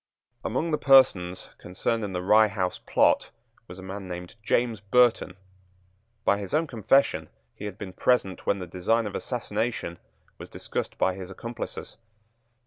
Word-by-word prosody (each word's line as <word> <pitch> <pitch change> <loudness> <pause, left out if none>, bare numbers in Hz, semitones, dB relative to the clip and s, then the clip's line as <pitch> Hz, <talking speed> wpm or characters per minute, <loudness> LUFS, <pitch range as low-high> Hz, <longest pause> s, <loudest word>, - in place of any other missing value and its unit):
Among 155 +8 -1
the 150 - +1
persons 95 -10 +4
concerned 110 +5 -2
in 100 - -3
the 90 -1 -3
Rye 110 +3 +6
House 95 -3 -2
plot - - +3 0.4
was 90 - -10
a 95 - -10
man 95 0 -7
named 90 -1 -7
James 115 0 +1
Burton. 110 -3 +2 0.9
By 100 - +3
his 100 +6 -3
own 160 +2 +2
confession 135 +1 +2 0.2
he 105 - -9
had 100 -2 -6
been 95 -3 -7
present 95 -4 0
when 100 - +2
the 90 - -5
design 95 +7 0
of 105 - -5
assassination 115 -6 -3 0.4
was - - -9
discussed - - -5
by 95 - +2
his 95 0 -8
accomplices. 115 +5 -7
100 Hz, 155 wpm, -26 LUFS, 95-120 Hz, 0.9 s, Rye